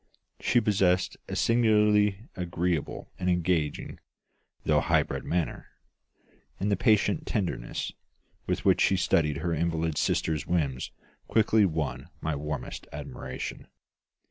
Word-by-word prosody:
She 120 - +3
possessed 95 -4 +2
a - - -4
singularly 105 -2 +3
agreeable 90 -3 -2
and 90 -1 0
engaging, 85 -4 0 0.7
though - - +4
high - - +3
bred - - -5
manner; 85 -1 -2 0.9
and 100 +2 0
the - - +4
patient 105 -1 +2
tenderness 90 - -2 0.6
with - - -1
which - - +4
she 95 - +4
studied 75 -4 +2
her 85 +2 -1
invalid 80 -1 0
sister's 75 -2 0
whims 75 -8 0 0.4
quickly 110 -1 +4
won 80 -5 -2
my 80 -1 -2
warmest 75 +1 -5
admiration. 65 0 -6
90 Hz, 115 wpm, -28 LUFS, 80-105 Hz, 0.9 s, though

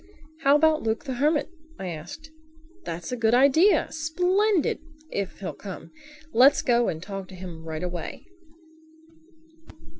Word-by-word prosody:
"How 280 -2 +4
about 315 +1 +4
Luke 220 0 -1
the 270 -3 -4
Hermit?" 295 +4 +1 0.3
I 190 - -5
asked. 175 - -8 0.5
"That's 165 +4 -5
a - - -1
good 230 -1 +2
idea—splendid—if 320 - +1
he'll 195 - -4
come. 195 -3 -9 0.4
Let's 260 +5 +6
go 240 -2 +3
and 160 +2 -4
ask 195 -2 -6
him 180 -3 -9
right 160 0 -5
away." 175 -2 -5
250 Hz, 120 wpm, -25 LUFS, 185-315 Hz, 0.5 s, Let's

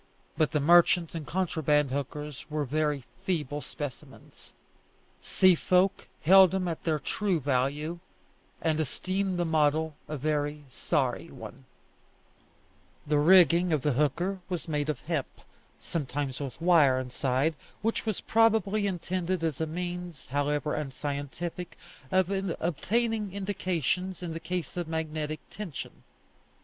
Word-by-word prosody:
But 155 - +2
the 150 - +1
merchant 170 +2 +5
and 160 -3 -5
contraband 150 -6 +1
hookers 145 +1 -5
were 150 -1 -1
very 150 0 0 0.2
feeble 150 -6 -1
specimens. 145 -4 -9 0.7
Sea 185 -1 +5
folk 185 +3 +2 0.2
held 190 +2 +8
them 185 0 -1
at 165 -2 -4
their 160 -2 +2
true 185 +4 -1
value, 145 +5 -1 0.6
and 160 -1 +1
esteemed 185 +5 -1
the 175 - +1
model 155 -1 +2
a 150 - -4
very 150 +1 -1
sorry 125 - -1
one, 70 - -10 1.4
The 150 0 +2
rigging 175 +1 +6
of 150 -4 +1
the 150 - +2
hooker 160 +8 0
was 175 -3 -3
made 150 -1 -1
of 145 -5 -2
hemp, 155 -4 -3 0.4
sometimes 140 -3 -3
with 135 -4 -6
wire 165 -6 +5
inside, 130 +4 0 0.3
which 225 +1 0
was 215 -4 -2
probably 215 -2 +3
intended 180 -1 -2
as 160 -3 -1
a 160 - 0
means, 175 -1 -5
however 145 +2 -1
unscientific, 145 +4 -4 0.3
of 185 0 +2 0.3
obtaining 210 +5 0
indications, 185 -2 -2
in 170 -2 -4
the 165 - -4
case 180 -3 -4
of 175 -2 -2
magnetic 155 -1 -3
tension. 190 -9 -7
160 Hz, 130 wpm, -29 LUFS, 145-180 Hz, 1.4 s, held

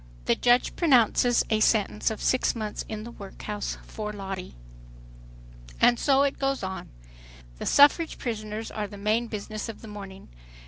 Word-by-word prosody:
The - - +4
judge 245 - +2
pronounces 245 - +4
a 220 - +3
sentence 215 -1 +2
of 220 - -5
"six 255 - +2
months 215 -2 -4
in 215 -1 -5
the 235 - -8
workhouse," 205 0 -6
for 210 -1 -6
Lottie. 195 - -6 1.2
And 240 -1 +5
so 275 -1 +4
it 280 0 -1
goes 275 -3 -1
on. 190 0 -5 0.7
The - - -4
suffrage 295 +3 +5
prisoners 215 -2 -4
are 210 -1 -3
the 205 - -10
main 215 +4 0
business 215 +1 -5
of 225 - -9
the - - -9
morning. 200 -2 -10
215 Hz, 155 wpm, -26 LUFS, 210-245 Hz, 1.2 s, And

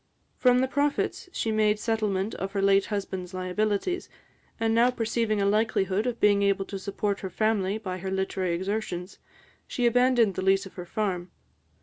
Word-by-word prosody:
From 250 -1 +4
the 260 - +2
profits, 285 +6 -1
she 225 - -1
made 215 -1 +2
settlement 215 -2 -1
of 195 +1 -5
her 200 - 0
late 195 0 +4
husband's 190 -3 -4
liabilities; 205 - -1 0.5
and 225 0 +1
now 235 +2 +5
perceiving 225 -3 0
a 200 - +2
likelihood 210 0 +1
of 240 -1 -2
being 205 -1 +4
able 200 -1 +1
to 195 0 -6
support 200 +1 -2
her 190 - -5
family 205 0 0
by 185 -4 -5
her 190 +2 -4
literary 190 -2 -1
exertions, 185 -1 -4 0.5
she 245 - -1
abandoned 240 -3 +4
the 185 - -3
lease 195 +1 +3
of 195 - -11
her 180 -1 -8
farm. 185 -4 -2
205 Hz, 175 wpm, -27 LUFS, 190-225 Hz, 0.5 s, now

